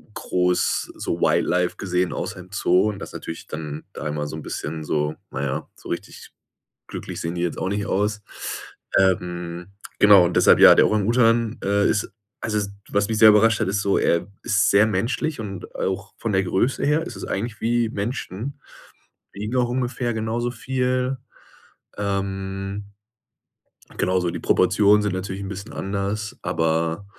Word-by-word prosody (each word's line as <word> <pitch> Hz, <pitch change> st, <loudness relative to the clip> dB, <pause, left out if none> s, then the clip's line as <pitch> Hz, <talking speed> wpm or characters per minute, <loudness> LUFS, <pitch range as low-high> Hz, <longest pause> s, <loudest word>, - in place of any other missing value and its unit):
groß 90 Hz, 0 st, 0 dB
so -, -, -3 dB
Wildlife 90 Hz, 0 st, +2 dB
gesehen, 90 Hz, -1 st, -1 dB
außer 105 Hz, -3 st, -4 dB
im 90 Hz, 0 st, -12 dB
Zoo 95 Hz, 0 st, +3 dB
und 105 Hz, -, -5 dB
das -, -, -8 dB
natürlich 80 Hz, -, -7 dB
dann 75 Hz, -1 st, -6 dB
da 75 Hz, -, -5 dB
immer 75 Hz, 0 st, -2 dB
so 75 Hz, -, -6 dB
'n 80 Hz, -, -6 dB
bisschen 80 Hz, +1 st, -5 dB
so, 75 Hz, 0 st, 0 dB, 0.2 s
na 65 Hz, -, -4 dB
ja, 70 Hz, -1 st, -3 dB
so -, -, -12 dB
richtig -, -, -6 dB, 0.6 s
glücklich -, -, -6 dB
sehen 85 Hz, +1 st, -3 dB
die 85 Hz, -, -3 dB
jetzt 85 Hz, -2 st, -2 dB
auch 95 Hz, -, -1 dB
nicht 100 Hz, +1 st, -1 dB
aus. 105 Hz, +1 st, 0 dB, 0.8 s
Ähm, 90 Hz, -2 st, 0 dB, 0.3 s
genau 100 Hz, -3 st, +8 dB
und 85 Hz, -, -1 dB
deshalb, -, -, +6 dB
ja, -, -, +10 dB
der -, -, +5 dB
Orang 105 Hz, -2 st, +1 dB
Utan, 115 Hz, 0 st, +3 dB
äh, 100 Hz, +1 st, +2 dB
ist 105 Hz, -, 0 dB, 0.3 s
also, 105 Hz, -2 st, -1 dB, 0.2 s
was 100 Hz, 0 st, +1 dB
mich 110 Hz, -, 0 dB
sehr 110 Hz, -, +9 dB
überrascht 105 Hz, +1 st, +5 dB
hat, -, -, 0 dB
ist 100 Hz, +2 st, 0 dB
so, 100 Hz, -, +2 dB
er 85 Hz, -, +2 dB, 0.2 s
ist 105 Hz, -3 st, +3 dB
sehr 105 Hz, +2 st, +5 dB
menschlich 115 Hz, +9 st, -1 dB
und 100 Hz, -4 st, -7 dB
auch 95 Hz, +1 st, -3 dB
von 115 Hz, -, -2 dB
der 95 Hz, 0 st, +2 dB
Größe 95 Hz, +8 st, 0 dB
her 150 Hz, +3 st, +2 dB
ist -, -, -7 dB
es -, -, -6 dB
eigentlich 110 Hz, +2 st, -4 dB
wie 120 Hz, 0 st, +1 dB
Menschen, 115 Hz, +4 st, -4 dB, 0.7 s
wiegen 105 Hz, +5 st, -4 dB
auch 125 Hz, -1 st, +2 dB
ungefähr 125 Hz, -1 st, -1 dB
genauso 110 Hz, +2 st, -2 dB
viel. 130 Hz, +1 st, -1 dB, 0.8 s
Ähm, 95 Hz, 0 st, -3 dB, 1.1 s
genau, 90 Hz, +1 st, +1 dB
also, 90 Hz, -2 st, +1 dB
die -, -, -5 dB
Proportionen 105 Hz, 0 st, +4 dB
sind 105 Hz, -, -1 dB
natürlich 95 Hz, +1 st, -4 dB
'n 95 Hz, -, -5 dB
bisschen 100 Hz, +1 st, -7 dB
anders, 100 Hz, +2 st, -3 dB
aber 80 Hz, +3 st, 0 dB
100 Hz, 170 wpm, -23 LUFS, 90-110 Hz, 1.1 s, ja